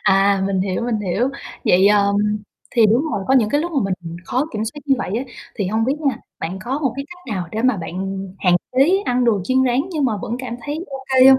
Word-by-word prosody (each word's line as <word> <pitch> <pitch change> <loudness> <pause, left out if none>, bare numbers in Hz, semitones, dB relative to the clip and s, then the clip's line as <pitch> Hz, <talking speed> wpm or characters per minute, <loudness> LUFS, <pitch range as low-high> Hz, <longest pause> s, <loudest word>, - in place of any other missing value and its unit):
À, 195 0 +4
mình 195 -1 0
hiểu, 190 +3 -1
mình 235 -3 -1
hiểu, 210 +6 0 0.4
vậy, 185 +2 +5
à, 205 -1 +5 0.7
thì 230 -3 +5
đúng 230 +6 +3
rồi, 195 - -2
có 265 - +5
những 225 -5 +4
cái 290 - +2
lúc 345 +2 -3
mà 280 - +1 0.2
mình 165 0 -7
khó 260 +5 0
kiểm 215 0 -2
soát 295 +6 -6
như 275 - +5
vậy - - -3
á. 260 - -3 0.3
Thì 200 - -1
hông 220 +4 +1
biết 265 - +1
nha, 275 -6 +1 0.2
bạn 175 +4 -4
có 265 +4 -1
một 270 -6 0
cái 275 - -3
cách 355 - -7
nào 175 -3 -3
để 220 +2 -2
mà 255 -4 +3
bạn 190 +2 -4
hạn 180 -2 +4 0.2
chế 300 +10 +4
ăn 250 0 +2
đồ 215 -5 +3
chiên 260 +5 +2
rán 250 +1 +2
nhưng 305 -5 0
mà 235 - +2
vẫn 235 - -3
cảm 255 -2 -5
thấy 305 +4 -3
ô 270 -1 -7
kê 260 0 +8
hông? 265 - +8
235 Hz, 260 wpm, -20 LUFS, 195-265 Hz, 0.7 s, kê